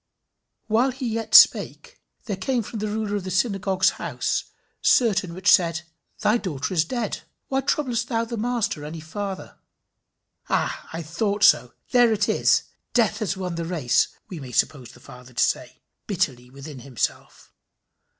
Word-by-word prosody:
"While 230 +4 +2
he 260 0 -4
yet 225 0 -1
spake, 485 +1 +5 0.2
there 210 -5 -2
came 235 +6 -1
from 220 +1 -7
the 215 - -2
ruler 210 -1 -2
of 200 - -5
the 185 - -5
synagogue's 190 -1 +1
house - - -2 0.4
certain 200 -8 +3
which 185 - +3
said, 165 -3 +3 0.4
Thy 215 +3 +3
daughter 180 - -4
is 165 -2 +2
dead: 235 0 -3 0.3
why 270 0 +1
troublest 245 -4 -1
thou 230 -2 0
the 235 +1 -5
Master 230 -8 -1
any 155 +2 -6
further?" 190 +5 -6 0.9
"Ah! - - -1
I 165 +1 -5
thought 200 +6 -1
so! 120 0 +5 0.2
There 245 -2 +5
it 210 -2 +1
is! - - +3 0.3
Death 220 -3 +2
has 195 -4 -2
won 180 -2 -3
the 170 0 -3
race!" 160 -8 +1 0.2
we 180 - -7
may 130 -3 -9
suppose 130 -1 0
the - - -17
father 125 0 -14
to - - +2
say - - -2 0.2
bitterly 135 -11 -2
within 140 +1 -10
himself. 125 -1 -5
195 Hz, 160 wpm, -24 LUFS, 160-230 Hz, 0.9 s, spake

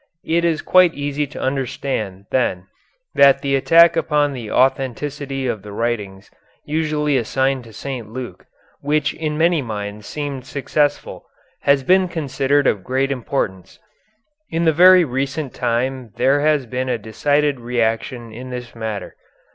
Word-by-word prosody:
It 170 +1 +1
is 165 -2 0
quite 185 -2 +5
easy 145 0 -2
to 145 - -10
understand, 130 -7 -3
then, 95 -8 0 0.5
that 140 0 +5
the 140 -1 +1
attack 165 +4 +5
upon 150 -3 +1
the 120 -5 -7
authenticity 135 +2 0
of 110 -5 -2
the 105 +1 -10
writings 100 -3 -3 0.3
usually 150 -2 0
assigned 130 +2 0
to 115 - -13
St. 125 -2 -6
Luke, 125 +2 -8 0.3
which 150 +1 0
in 155 -2 -3
many 165 0 +3
minds 105 -3 -6
seemed 140 -4 -5
successful, 145 +1 -1 0.4
has 140 -1 +4
been 185 +4 +4
considered 140 -3 0
of 100 -7 +1
great 135 +4 0
importance. 115 -8 -3 0.7
In 165 +1 -1
the 160 - +4
very 180 +2 +7
recent 135 +1 -3
time 125 -1 -2
there 135 +2 +3
has 150 -3 +2
been 130 +2 -3
a 125 - 0
decided 145 +6 0
reaction 120 0 -2
in 125 +3 -8
this 125 -1 -7
matter. 110 -3 -5
135 Hz, 145 wpm, -20 LUFS, 120-150 Hz, 0.7 s, very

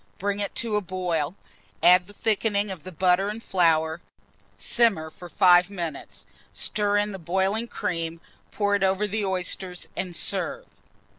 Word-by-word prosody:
Bring 200 +1 -2
it 200 - -3
to 225 -3 0
a - - 0
boil, 175 -4 -2 0.5
add 180 +1 +6
the 205 - -13
thickening 205 -1 0
of 185 -1 -9
butter 185 +2 +3
and 220 +2 -6
flour, 160 -2 +2 0.5
simmer 195 -10 +2
for 175 +2 -11
5 180 +1 +5
minutes, 170 -7 -6 0.3
stir 205 -1 0
in 205 0 +1
the 195 - -7
boiling 190 +7 0
cream, 165 -5 -3 0.3
pour 205 -1 0
it 200 - +2
over 195 +2 +2
the 210 +1 -2
oysters, 185 -1 -3
and 180 -2 -3
serve. - - -1
190 Hz, 150 wpm, -25 LUFS, 175-205 Hz, 0.5 s, add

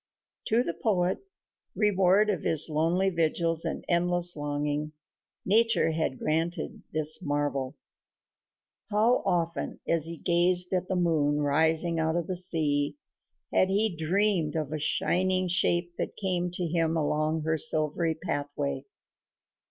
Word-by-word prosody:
To 230 +3 +2
the 170 - -3
poet, 185 -4 0 0.6
reward 205 0 +3
of 185 -7 -3
his 160 0 +3
lonely 170 +5 +1
vigils 165 -1 0
and - - -4
endless 175 0 +3
longing, 145 +1 -3 0.5
nature 225 -4 +2
had 160 -5 -2
granted 165 +3 -2
this 155 +1 +1
marvel. 145 -3 -2 1.1
How 220 +4 +2
often, 170 -1 -2
as 165 -1 +2
he 170 - -4
had - - -20
gazed 180 +1 +3
at 185 0 -1
the 190 - -2
moon 150 -4 +1
rising 160 +3 +1
out 160 0 0
of 175 -1 -1
the 185 - -4
sea, 155 - 0 0.6
had 185 - +3
he 205 0 +3
dreamed 170 0 0
of 155 -2 -3
a 155 - -3
shining 185 +4 0
shape 175 -1 +1
that - - -4
came 180 -3 0
to 180 0 -4
him 165 0 0
along 155 +1 -1
her 160 +1 0
silver 155 -3 +1
pathway. 145 -4 -4
165 Hz, 135 wpm, -27 LUFS, 155-180 Hz, 1.1 s, reward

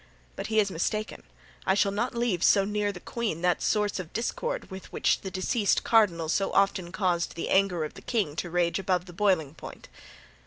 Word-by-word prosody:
But - - -5
he 220 0 +2
is 200 -2 +2
mistaken; 215 +5 -2 0.4
I 190 - +2
shall 200 0 +2
not 235 +5 -2
leave 230 -7 0
so 195 -2 +5
near 205 0 -1
the 185 - -9
queen 205 -6 -3
that 180 -1 +2
source 210 -2 +1
of 175 -3 -7
discord 475 - -3
with 190 0 -9
which - - +1
the 190 - -5
deceased 195 +2 +1
cardinal 185 -8 +3
so 195 +4 0
often 195 -3 +2
caused 180 -3 0
the 165 - -4
anger 190 -4 +2
of 155 - -5
the - - -12
king 205 -12 -1
to 175 - -3
rage 175 +1 +1
above 185 -2 0
the 175 - -11
boiling 180 -7 +1
point." - - -11
195 Hz, 200 wpm, -27 LUFS, 175-210 Hz, 0.4 s, so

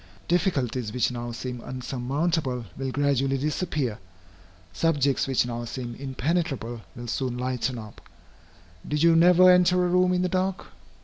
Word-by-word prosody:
Difficulties 135 - 0
which 125 +2 +1
now 120 -1 -5
seem 125 +1 -6
insurmountable, 130 +1 -2
will 135 0 -3
gradually 135 -1 +1
disappear; 145 - -2 0.7
subjects 140 - +1
which 135 -2 +2
now 120 -1 -4
seem 120 0 -5
impenetrable, 135 -3 -2
will 120 - -7
soon 125 +1 -2
lighten 125 0 -2
up. 110 -2 -10 0.9
Did 150 +1 0
you 170 -1 +6
never 180 +2 +7
enter 180 0 +4
a - - +2
room 180 +1 +3
in 180 0 +1
the - - +2
dark? 185 +1 -1
135 Hz, 140 wpm, -26 LUFS, 125-170 Hz, 0.9 s, never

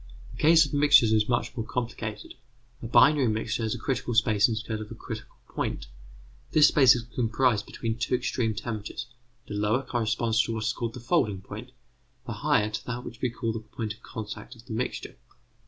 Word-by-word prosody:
The - - -9
case 160 +1 +7
of 145 - -8
mixtures 145 -6 +6
is 110 0 +2
much 120 0 0
more 115 - -2
complicated. 115 -2 -5 0.5
A 115 - -5
binary 140 +2 +5
mixture 115 +2 -1
has 110 -1 -1
a - - -5
critical 125 -3 -2
space 110 -1 +4
instead 110 -1 -3
of 105 - -8
a - - -8
critical - - -8
point. - - -3 0.7
This 155 -1 +7
space 130 -4 +6
is 120 - -3
comprised 115 -1 0
between 115 0 -4
two 120 +2 +1
extreme 120 -3 -1
temperatures, 110 +1 -5 0.4
the - - -6
lower 105 +5 +1
corresponding 115 -2 0
to 115 - -3
what 110 - -3
is 115 +1 0
called 115 -2 -4
the - - -7
folding 105 -4 +1
point, 110 +6 -9 0.5
the 120 - -4
higher 105 0 +1
to 110 - -5
that 125 0 -4
which 115 - -10
we 125 - +1
call 115 -1 -3
the 115 - -3
point 110 0 -5
of 110 - -21
contact 110 +3 -8
of 115 0 -17
the 120 - -7
mixture. 125 +3 -4
115 Hz, 200 wpm, -27 LUFS, 110-125 Hz, 0.7 s, case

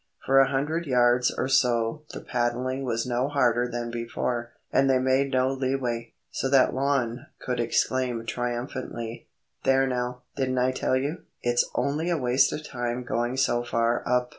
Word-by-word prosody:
For 135 0 +5
a 135 - +5
hundred 150 +5 -1
yards 125 -1 +4
or - - 0
so 125 0 +2
the - - -7
paddling 125 +2 -1
was 115 -3 -1
no 125 +1 0
harder 125 -4 +2
than 120 0 -3
before, 120 0 -3 0.2
and 135 0 +4
they 130 - +4
made 130 +2 +2
no 130 0 +2
leeway, 130 -3 -2 0.2
so 135 - -2
that 135 -1 +4
Lon 130 -1 0
could 125 -1 -3
exclaim 120 0 0
triumphantly,— 120 -1 -4 0.4
"There 135 0 +4
now, 125 -1 -3
didn't 130 -1 -1
I 125 +1 +3
tell 130 0 0
you? 145 +6 -1 0.2
It's 120 0 +2
only 155 +5 0
a 170 - +1
waste 125 -1 +3
of 150 - -5
time 120 -1 -3
going 120 +1 -1
so 120 -2 +2
far 115 0 +1
up." 125 0 +1
125 Hz, 165 wpm, -26 LUFS, 120-135 Hz, 0.4 s, For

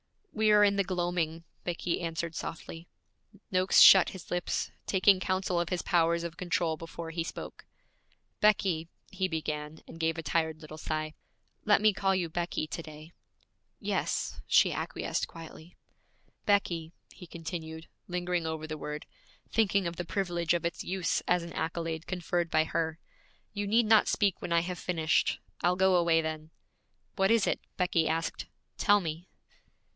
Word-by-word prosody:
'We 215 -1 +3
are 210 0 +7
in 200 -1 +3
the 200 - +3
gloaming,' 175 -3 -2 0.2
Becky 175 0 -2
answered 165 0 -3
softly. 165 +1 -7 0.6
Noakes 185 0 +4
shut 190 -2 +9
his 190 - -11
lips, 175 0 -1 0.2
taking 190 0 +4
counsel 185 -1 0
of 175 - -1
his 180 -2 -2
powers 170 0 +2
of 170 0 -6
control 170 -2 0
before 165 +1 -7
he 165 0 -2
spoke. - - -8 0.7
'Becky,' 190 -6 +2 0.2
he 190 - -1
began, 155 -2 -4
and 165 - -11
gave 165 0 0
a 165 - -4
tired 160 +2 0
little 155 0 -10
sigh. 155 -1 -3 0.5
'Let 205 0 +5
me 215 -1 +5
call 195 0 +1
you 175 -3 -1
"Becky" 170 -1 -2
to 155 - -5
day.' 155 0 -11 0.7
'Yes,' - - -2
she - - +5
acquiesced - - -2
quietly. 165 +1 -12 0.7
'Becky,' 170 -5 +1 0.2
he 180 - -12
continued, 160 -1 -7 0.2
lingering 175 -1 -1
over 160 -1 -4
the 155 -1 -6
word, 150 0 -5 0.5
thinking 200 -3 +2
of 170 -1 -3
the 175 - -3
privilege 175 -2 0
of 170 - -2
its 170 - -3
use 185 -1 -1
as 180 -1 +2
an 170 - -8
accolade 165 0 -3
conferred 175 -2 -1
by 155 0 +3
her, 160 +1 -2 0.6
'you 205 -1 -3
need 225 +3 +4
not 215 0 +5
speak 200 -4 +1
when - - -5
I 170 - +4
have 180 +1 -5
finished; 160 -3 +1 0.2
I'll 180 +1 +3
go 190 0 +4
away 170 -2 +4
then.' 155 0 -5 0.7
'What 195 -1 +2
is 230 -3 +4
it?' - - 0 0.2
Becky 180 -3 +2
asked. 165 +1 -2 0.3
'Tell 205 -1 +4
me.' 165 +1 -5
170 Hz, 160 wpm, -30 LUFS, 160-185 Hz, 0.7 s, shut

